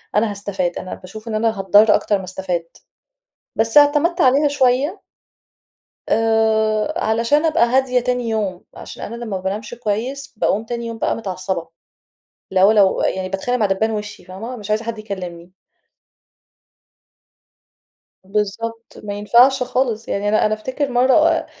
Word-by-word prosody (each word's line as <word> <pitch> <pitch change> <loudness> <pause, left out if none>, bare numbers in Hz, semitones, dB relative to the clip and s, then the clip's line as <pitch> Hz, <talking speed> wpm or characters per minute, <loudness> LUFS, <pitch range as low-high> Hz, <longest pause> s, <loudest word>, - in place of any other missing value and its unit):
أنا 210 +1 +2
هاستفاد، 195 -3 -3
أنا 185 - -6
باشوف 215 +5 -12
إن 220 - -3
أنا 220 -1 0
هاتضّر 205 +3 +5
أكتر 205 - +1
ما 190 - -8
استفاد. 185 -2 -3 0.9
بس 225 +5 +4
اعتمدت 295 +5 +3
عليها 280 +1 +4
شوية. 275 +1 +1 1.1
آآ 220 +2 +2
علشان 230 +4 +1
أبقى 305 -7 +3
هادية 255 +1 +2
تاني 245 -1 -1
يوم، 205 -5 -2
عشان - - -9
أنا 230 - -6
لمّا 240 0 -7
ما 185 - -10
بانامش 210 +4 -4
كويّس؛ 240 +5 -3
باقوم 210 +1 +1
تاني 235 0 -4
يوم 230 - -6
بقى - - 0
متعصبة. 185 -4 -4 0.8
لو 190 +2 +5
لو 200 -3 +3
يعني 185 0 -1
باتخانق 195 +7 -2
مع 215 - +2
دبّان 195 +3 0
وشي 210 -1 -6
فاهمة؟ 215 +7 -7
مش 210 -3 -9
عايزة 215 +2 0
حد 230 -1 -5
يكلمني. 180 -4 -7 2.7
بالضبط 215 +3 -4
ما 205 -1 -4
ينفعش 240 +6 +4
خالص 245 -3 -1
يعني، 205 +1 -1
أنا 215 - +3
أنا 215 - +1
أفتكر 260 +6 -3
مرّة 305 +7 +3
220 Hz, 145 wpm, -19 LUFS, 200-245 Hz, 2.7 s, هاتضّر